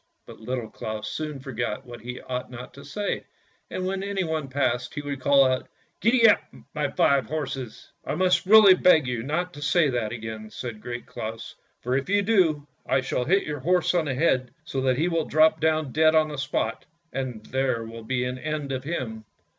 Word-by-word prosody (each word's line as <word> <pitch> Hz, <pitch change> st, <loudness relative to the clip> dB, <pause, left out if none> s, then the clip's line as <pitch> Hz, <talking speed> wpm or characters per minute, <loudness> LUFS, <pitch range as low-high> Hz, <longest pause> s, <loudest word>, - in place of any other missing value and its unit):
But -, -, -12 dB
Little 120 Hz, +1 st, -4 dB
Claus 110 Hz, -1 st, -5 dB
soon 150 Hz, +1 st, -4 dB
forgot 120 Hz, -5 st, -4 dB
what 120 Hz, -2 st, -10 dB
he 125 Hz, +2 st, -6 dB
ought 125 Hz, 0 st, -4 dB
not 125 Hz, 0 st, -9 dB
to 140 Hz, -, -12 dB
say, 200 Hz, +9 st, -3 dB, 0.5 s
and 185 Hz, -, -3 dB
when 190 Hz, +1 st, -2 dB
anyone 180 Hz, -7 st, -2 dB
passed, 125 Hz, -2 st, -1 dB
he 145 Hz, -, -3 dB
would 140 Hz, -1 st, -4 dB
call 140 Hz, 0 st, +5 dB
out, 130 Hz, 0 st, 0 dB, 0.2 s
" -, -, -44 dB
Gee 230 Hz, 0 st, +5 dB
up, 210 Hz, -, +5 dB, 0.3 s
my 150 Hz, -2 st, -1 dB
five 140 Hz, -2 st, +2 dB
horses." 135 Hz, -5 st, -5 dB
" -, -, -47 dB
I -, -, -3 dB
must 185 Hz, 0 st, +2 dB
really 210 Hz, -2 st, +9 dB
beg 180 Hz, -5 st, +5 dB
you 125 Hz, -2 st, -2 dB
not 175 Hz, +8 st, -2 dB
to 145 Hz, -, -10 dB
say 155 Hz, +1 st, +3 dB
that 120 Hz, -4 st, -1 dB
again," 110 Hz, -2 st, -6 dB
said 110 Hz, -2 st, -7 dB
Great 120 Hz, +1 st, -6 dB
Claus, 110 Hz, +1 st, -6 dB
" -, -, -44 dB
for 125 Hz, +1 st, 0 dB
if 140 Hz, +6 st, -1 dB
you 205 Hz, 0 st, +3 dB
do, 175 Hz, -9 st, +2 dB, 0.2 s
I 135 Hz, -, +1 dB
shall 125 Hz, -1 st, -2 dB
hit 195 Hz, +6 st, +3 dB
your 150 Hz, -1 st, -4 dB
horse 180 Hz, +7 st, +2 dB
on 170 Hz, -3 st, +2 dB
the 135 Hz, -3 st, -2 dB
head, 130 Hz, -4 st, +2 dB, 0.2 s
so 135 Hz, -5 st, -3 dB
that 130 Hz, -1 st, +2 dB
he 160 Hz, +4 st, +1 dB
will 165 Hz, -3 st, 0 dB
drop 155 Hz, +1 st, +4 dB
down 155 Hz, -3 st, +1 dB
dead 155 Hz, +2 st, +4 dB
on 155 Hz, -1 st, +4 dB
the 150 Hz, -, -6 dB
spot, 135 Hz, +1 st, -2 dB, 0.3 s
and 125 Hz, -5 st, -4 dB
there 130 Hz, -3 st, -1 dB
will 115 Hz, 0 st, -9 dB
be 125 Hz, +2 st, -1 dB
an 125 Hz, 0 st, -3 dB
end 150 Hz, 0 st, -3 dB
of 130 Hz, -1 st, -3 dB
him." 120 Hz, -8 st, -4 dB
140 Hz, 215 wpm, -25 LUFS, 125-160 Hz, 0.5 s, really